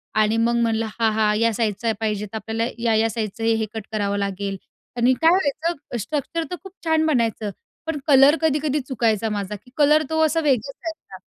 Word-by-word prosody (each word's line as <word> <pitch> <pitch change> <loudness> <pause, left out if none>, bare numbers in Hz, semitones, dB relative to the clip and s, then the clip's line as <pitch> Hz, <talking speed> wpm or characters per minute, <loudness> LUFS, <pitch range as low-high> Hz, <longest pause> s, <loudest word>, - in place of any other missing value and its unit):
आणि 215 +1 +3
मग 235 +1 +2
म्हणलं, 225 -1 +1
हा-हा, 220 -1 +2
या 230 +2 +2
साईजचा 225 0 0
पाहिजे, 210 -2 -1
तर 210 - -10
आपल्याला 225 +2 -2
या-या 225 -1 +2
साईजचं 220 0 -4
हे 225 -1 +2
कट 220 -2 -5
करावं 205 -2 -1
लागेल 200 0 -3 0.4
आणि 245 +2 +4
काय 325 - +6
व्हायचं, 315 -5 -1
स्ट्रक्चर 300 - -3
तर - - -1
खूप 385 - -10
छान 320 -1 +2
बनायचं, 230 -7 0 0.4
पण 320 -2 -2
कलर 275 +1 +7
कधी-कधी 300 -2 +1
चुकायचा 225 -4 0
माझा 205 -1 -3
की 225 +5 -16
कलर 300 +1 +5
तो 320 0 0
असा 315 +1 +1
वेगळाच 275 -4 +1
दिसायचा. 330 -1 -8
230 Hz, 180 wpm, -22 LUFS, 215-295 Hz, 0.4 s, कलर